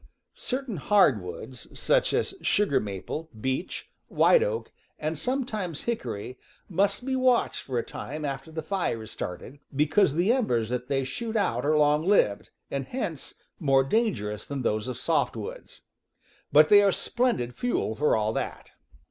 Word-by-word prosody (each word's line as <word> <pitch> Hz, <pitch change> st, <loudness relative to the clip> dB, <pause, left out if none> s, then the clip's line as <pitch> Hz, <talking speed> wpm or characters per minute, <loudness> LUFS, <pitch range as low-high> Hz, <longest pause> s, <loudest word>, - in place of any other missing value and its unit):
Certain 255 Hz, -5 st, -4 dB
hardwoods, 130 Hz, -, +1 dB
such -, -, +2 dB
as -, -, 0 dB
sugar 195 Hz, -10 st, +2 dB
maple, 105 Hz, -, -5 dB
beech, 130 Hz, -, -3 dB, 0.2 s
white -, -, +5 dB
oak, 475 Hz, -1 st, -2 dB, 0.3 s
and 155 Hz, +1 st, -2 dB
sometimes 215 Hz, -, -3 dB
hickory, 125 Hz, -, -4 dB, 0.3 s
must 200 Hz, +5 st, 0 dB
be 265 Hz, -1 st, 0 dB
watched 255 Hz, -2 st, +2 dB
for 130 Hz, -3 st, -4 dB
a 120 Hz, -, +1 dB
time 150 Hz, +2 st, -6 dB
after 135 Hz, +2 st, -5 dB
the 160 Hz, 0 st, -4 dB
fire 165 Hz, -, -1 dB
is 110 Hz, -, -10 dB
started, 110 Hz, +10 st, -6 dB, 0.2 s
because 150 Hz, +2 st, +3 dB
the 185 Hz, +8 st, +3 dB
embers 120 Hz, -, +1 dB
that 125 Hz, 0 st, -3 dB
they 135 Hz, -1 st, 0 dB
shoot 225 Hz, -, -4 dB
out 180 Hz, -, +1 dB
are 155 Hz, 0 st, +3 dB
long 150 Hz, +1 st, +4 dB
lived, 170 Hz, -, +2 dB, 0.2 s
and 135 Hz, -1 st, -3 dB
hence 170 Hz, -, -4 dB, 0.2 s
more 135 Hz, -4 st, +4 dB
dangerous 135 Hz, -, -1 dB
than 140 Hz, -2 st, -4 dB
those 110 Hz, 0 st, 0 dB
of 125 Hz, -2 st, -4 dB
softwoods; 125 Hz, -8 st, -2 dB, 0.7 s
but 150 Hz, +2 st, +7 dB
they 205 Hz, -1 st, +8 dB
are 200 Hz, -1 st, +4 dB
splendid 230 Hz, -, 0 dB
fuel 245 Hz, -, -1 dB
for 150 Hz, +5 st, +2 dB
all 110 Hz, 0 st, 0 dB
that. -, -, -4 dB
150 Hz, 155 wpm, -27 LUFS, 125-210 Hz, 0.7 s, they